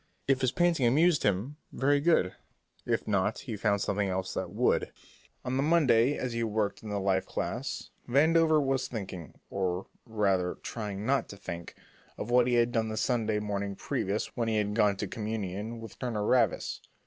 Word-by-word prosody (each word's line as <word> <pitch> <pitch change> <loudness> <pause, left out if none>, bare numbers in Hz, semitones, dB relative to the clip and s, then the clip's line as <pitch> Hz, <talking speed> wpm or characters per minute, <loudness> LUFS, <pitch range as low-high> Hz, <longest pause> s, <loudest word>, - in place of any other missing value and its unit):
If 135 -1 +3
his 130 -1 +2
painting 170 -7 +2
amused 155 +5 +4
him, 105 +9 0
very 145 +2 +2
good; 145 - +3 0.5
if - - 0
not, 105 0 +1
he 115 - -5
found 100 -1 +1
something 100 0 0
else 95 0 -2
that - - -3
would. - - +1 0.5
On 125 - -2
the - - +2
following 150 - +1
Monday 140 -5 +4
as 125 -2 -3
he 115 0 -1
worked 105 -2 -1
in 110 - -8
the 100 -1 -1
life 95 -1 +1
class, - - -4 0.2
Vandover 160 +4 +4
was 135 -2 0
thinking, 95 -8 -7 0.2
or, 95 -1 -1 0.2
rather, 100 -5 +1
trying 105 -3 -4
not 135 +3 +1
to 100 - -9
think, 85 -3 -7 0.4
of 115 - -5
what 125 0 +5
he 125 - +2
had 120 0 +3
done 115 -2 0
the 110 - -4
Sunday 110 -2 +1
morning 100 -1 -3
previous 100 +2 -2
when 115 -2 -1
he 110 -1 +1
had 105 -1 0
gone 105 -2 +3
to 105 - -3
communion 105 +1 -4
with 115 -2 -10
Turner 115 -5 -2
Ravis. 120 -1 +2
110 Hz, 185 wpm, -29 LUFS, 100-130 Hz, 0.5 s, what